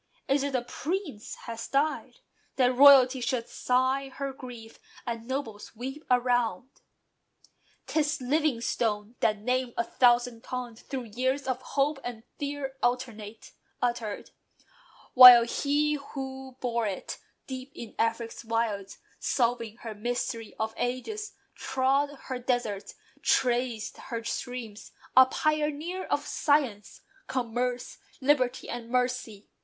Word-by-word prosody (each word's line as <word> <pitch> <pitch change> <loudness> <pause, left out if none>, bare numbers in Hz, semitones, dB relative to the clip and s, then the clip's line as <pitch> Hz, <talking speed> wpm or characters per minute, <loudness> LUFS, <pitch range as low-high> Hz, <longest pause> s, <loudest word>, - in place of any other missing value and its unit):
Is 275 +1 +2
it 280 -1 -2
a 245 - 0
Prince 295 - -4
has 230 -1 -5
died? 305 - -1 0.3
That 255 -1 +3
royalty 265 -1 +8
Should 235 -1 -1
sigh 260 +2 +1
her 275 0 -5
grief, 245 -4 -10 0.3
and 230 -1 -4
nobles 235 -6 -5
weep 265 +6 -6
around? 245 -2 +1 1.0
'Tis 305 0 0
LIVINGSTONE! 240 -6 0
That 215 -1 +2
name 250 +3 -1
a 235 - +2
thousand 240 -1 +2
tongues 245 -2 -6
Through 265 -3 -5
years 260 +5 -1
of 260 -1 -1
hope 280 +2 0
and 235 -2 -6 0.2
fear 280 -2 -4
alternate, 230 -4 -3 0.3
uttered; 235 -4 -2 0.8
While 250 -2 +11
he 290 +5 +1 0.2
who 265 -1 -6
bore 235 -3 0
it, 195 -2 -5 0.3
deep 260 0 -7
in 230 - -8
Afric's 230 +1 -1
wilds, 225 -4 -2 0.2
Solving 235 -3 0
her 225 -2 -6
mystery 230 0 -3
of 220 0 -1
ages, 335 - -3 0.2
trod 270 +2 +1
Her 255 -1 -4
deserts, 240 -5 -2 0.3
traced 245 -3 +1
her 230 -3 -6
streams, 230 -2 -5 0.2
a 260 0 +9
pioneer 310 +5 -1
Of - - -1
science, 265 -9 0 0.3
commerce, 245 0 -2 0.2
liberty, 260 -2 +1
and 235 -1 -6
mercy. 250 -4 -1
250 Hz, 120 wpm, -28 LUFS, 230-270 Hz, 1.0 s, While